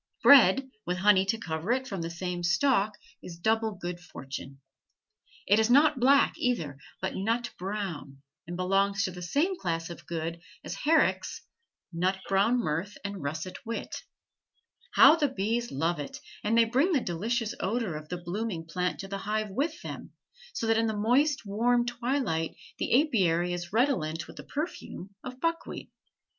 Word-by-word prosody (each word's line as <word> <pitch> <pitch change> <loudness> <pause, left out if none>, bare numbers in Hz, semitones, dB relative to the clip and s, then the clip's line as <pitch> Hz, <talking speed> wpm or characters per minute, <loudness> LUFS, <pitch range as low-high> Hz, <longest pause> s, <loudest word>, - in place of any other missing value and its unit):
Bread 265 0 +7
with 180 +1 -2
honey 190 0 +4
to 225 +3 +1
cover 165 0 -3
it 260 +1 +1
from 195 -7 -4
the 165 - -3
same 175 +1 -4
stalk 205 +3 +2 0.2
is 170 -2 -9
double 220 +4 +1
good 175 -1 -5
fortune. 135 -5 -8 0.9
It 205 +3 +4
is 220 +1 +3
not 285 +2 +5
black, 275 +3 +5
either, 160 - -1 0.2
but 190 - -1
nut 230 +5 -1
brown, 180 -8 -5 0.2
and 175 +1 -5
belongs 195 +2 +2
to 185 - -1
the 180 0 -9
same 290 - +1
class 165 -1 -2
of 170 - -11
goods 165 0 -3 0.2
as - - -5
Herrick's 320 +2 +1 0.5
"Nut 185 +3 +1
brown 200 +5 +3
mirth 190 -1 -2
and 200 -1 -4
russet 155 +5 -4
wit." 230 0 -4 1.0
How 320 - +8
the 300 -3 +2
bees 235 0 -1
love 160 +4 0
it, 145 - -6 0.3
and 225 +2 +2
they 230 - +6
bring 270 +11 +2
the 290 - +4
delicious 220 +6 -1
odor 215 -4 -1
of 155 0 -8
the 180 - -3
blooming 175 0 -4
plant 180 +2 -2
to 195 - -7
the 195 0 -4
hive 210 +1 -2
with 295 +10 -2
them, - - -7 0.4
so 230 - -2
that 225 0 +3
in 225 - +2
the 220 -1 -2
moist 260 +5 +2
warm 240 +4 +2
twilight 240 - -1 0.2
the 265 +5 +4
apiary 180 - +1
is 175 -1 -5
redolent 185 - +1
with - - -13
the - - -8
perfume 280 - -5
of 255 0 -8
buckwheat. 330 +2 -3
200 Hz, 170 wpm, -29 LUFS, 175-240 Hz, 1.0 s, How